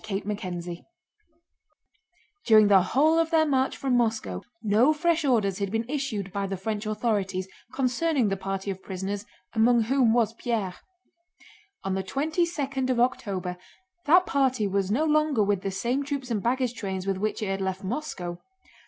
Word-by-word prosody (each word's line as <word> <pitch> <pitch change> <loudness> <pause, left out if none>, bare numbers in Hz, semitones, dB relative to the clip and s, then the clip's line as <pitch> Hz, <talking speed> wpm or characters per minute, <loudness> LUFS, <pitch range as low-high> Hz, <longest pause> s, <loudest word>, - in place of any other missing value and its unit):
CHAPTER 210 0 -3 0.3
XII 170 0 -7 1.6
During 215 -2 +7
the 195 -2 +7
whole 300 - +3
of 330 0 +1
their 320 -1 +4
march 265 -3 +1
from 265 -2 0
Moscow 225 -2 0 0.2
no 220 +8 +4
fresh 325 +1 +1
orders 215 -8 +1
had 200 -1 -1
been 225 +1 -1
issued 240 -9 -3
by 200 -1 -1
the 195 0 -3
French 210 +2 -3
authorities 205 -4 -1 0.2
concerning 265 -1 +1
the 195 - 0
party 195 +1 -3
of 190 0 -7
prisoners 195 +2 -4 0.3
among 235 +1 +4
whom 250 0 +3
was 230 -2 +2
Pierre. 225 -6 -2 1.1
On 195 - -1
the 190 - 0
twenty 310 - 0
second 275 -5 -2
of 250 -2 +1
October 195 -7 -1 0.5
that 355 +4 +6
party 260 -7 +1
was 195 -1 0
no 265 +10 +1
longer 305 -6 +2
with 200 -2 +1
the 195 - -2
same 240 +8 -1
troops 275 -3 -4
and 215 -3 0
baggage 250 +1 0
trains 190 -5 -4
with 195 -1 0
which 215 +2 -2
it 205 - -2
had 195 0 -2
left 190 +1 -3
Moscow. 185 - -4
220 Hz, 170 wpm, -26 LUFS, 195-270 Hz, 1.6 s, During